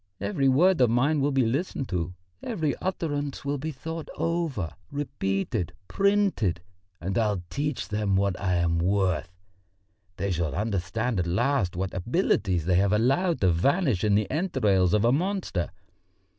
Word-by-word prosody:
Every 140 -9 +1
word 170 +4 +4
of 125 - +5
mine 140 +6 +2
will 140 - +2
be 135 -3 +2
listened 135 +2 -1
to, 90 -1 -2 0.3
every 160 -11 -1
utterance 145 -7 -3
will 140 0 -1
be 155 +4 -3
thought 160 +3 -6
over, 165 - -1 0.2
repeated, 100 - -2
printed. 195 - +1 0.4
And 95 +5 -1
I'll 105 -5 0
teach 145 -1 -2
them 105 -2 0
what 100 -1 +1
I 90 -2 +1
am 85 -1 +1
worth! 90 -3 +1 0.9
They 100 - -1
shall 85 -4 -1
understand 105 +3 -1
at 85 - 0
last 100 0 +1
what 95 +1 -3
abilities 95 - 0
they 90 0 +3
have 100 +1 +3
allowed 135 - +2
to 95 -2 +4
vanish 130 - +1
in 105 -2 +3
the 105 -1 +2
entrails 110 - +2
of 105 +1 +2
a 120 - +5
monster. 175 - -1
110 Hz, 155 wpm, -26 LUFS, 95-145 Hz, 0.9 s, of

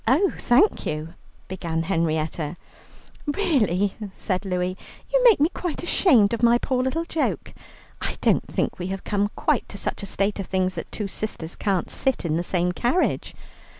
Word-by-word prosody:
"Oh, 315 - +4
thank 300 - +3
you," 155 +2 -4 0.3
began 165 -3 -2
Henrietta. 160 -2 -1 0.7
"Really," 230 - +1 0.2
said 185 0 -2
Louie, 180 -1 -1 0.4
"you - - +4
make 455 - +7
me 300 +3 +4
quite 350 -3 -4
ashamed 255 - +4
of 230 - -1
my 235 0 +6
poor 255 +1 0
little 295 +6 -1
joke. 325 -2 -2 0.5
I - - -3
don't - - +2
think - - -2
we 180 - -3
have 190 0 -4
come 205 0 0
quite - - 0
to 200 - -7
such - - -2
a 200 - -5
state 200 +1 0
of 195 - -4
things 185 -1 0
that 165 - -7
two 210 - -3
sisters 190 -5 -5
can't 195 -4 -1
sit 265 -8 0
in 155 -2 +1
the 170 - +1
same 180 0 0
carriage. 245 - 0
200 Hz, 175 wpm, -24 LUFS, 180-260 Hz, 0.7 s, make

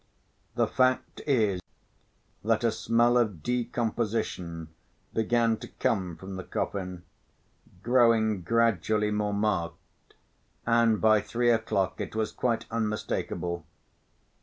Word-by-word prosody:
The - - +3
fact 130 0 +1
is 105 -9 +2 0.8
that 115 +1 +1
a 115 - +3
smell 120 +2 +3
of 105 -10 -1
decomposition 115 -8 -2 0.4
began 115 0 +2
to - - -9
come 90 -6 -1
from 95 0 -7
the 95 - -5
coffin, 90 -3 -4 0.8
growing 115 -4 +3
gradually 110 0 +2
more 105 0 0
marked, 100 -6 -3 0.5
and 115 -2 +3
by 110 -1 +5
three 120 +2 +1
o'clock 105 -5 0
it - - -5
was 110 -1 -1
quite 120 -2 -1
unmistakable. 105 -6 -2
110 Hz, 110 wpm, -28 LUFS, 95-115 Hz, 0.8 s, by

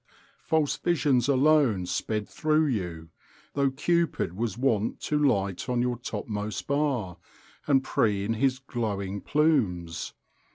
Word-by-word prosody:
_ - - -50 0.4
False 155 -3 +1
visions 140 -7 +2
alone 135 -8 +3
sped 105 +4 -2
through 155 0 +1
you, 90 - -3 0.4
though 140 -1 +2
Cupid 165 - 0
was 115 +2 -2
wont 115 -5 0
to 150 - 0
light 100 -7 0
on 125 -1 +1
your 125 -1 -1
topmost 105 -3 -4
bar, 135 -11 -1 0.5
and 135 -2 +4
preen 105 -4 +1
his 130 +3 +1
glowing 100 -7 -3
plumes. 95 - 0
120 Hz, 125 wpm, -27 LUFS, 100-140 Hz, 0.5 s, and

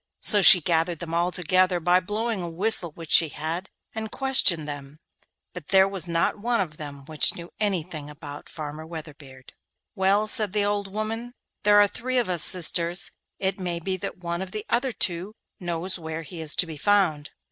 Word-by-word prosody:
So 205 -2 +8
she 190 -1 +9
gathered 165 +1 0
them 165 0 -7
all 170 +2 +1
together 185 +1 +1
by 175 +2 +3
blowing 210 +2 -3
a 175 - -4
whistle 180 +1 +1
which 165 -1 -10
she 165 -2 +5
had, 165 +6 -5 0.2
and 220 0 -5
questioned 210 - +1
them, 145 0 -8 0.6
but 180 -5 -9
there 190 0 +5
was 190 -4 -1
not 170 +4 0
one 235 +2 0
of 155 -5 -3
them 140 -2 -9
which 155 0 +2
knew 170 0 -9
anything 170 -7 -2
about 145 -1 -10
Farmer 155 0 -7
Weatherbeard. 150 -5 -11 0.4
'Well,' 200 +1 +2
said 210 -2 +5
the 205 -1 +1
old 205 -1 -2
woman, 225 +4 -5 0.3
'there 205 0 +5
are 205 - +6
three 255 +5 -3
of 240 -6 +1
us 175 -3 +1
sisters; 175 0 +2 0.3
it 190 0 -2
may 175 -2 -3
be 185 +3 -3
that - - -6
one 170 0 -4
of 190 -1 -7
the 215 0 -5
other 250 +2 +1
two 185 0 -3 0.2
knows 175 +1 -4
where 160 0 -6
he 165 +1 -9
is 155 -1 0
to - - +1
be 160 -3 -8
found. 165 -5 +1
180 Hz, 190 wpm, -25 LUFS, 160-205 Hz, 0.6 s, she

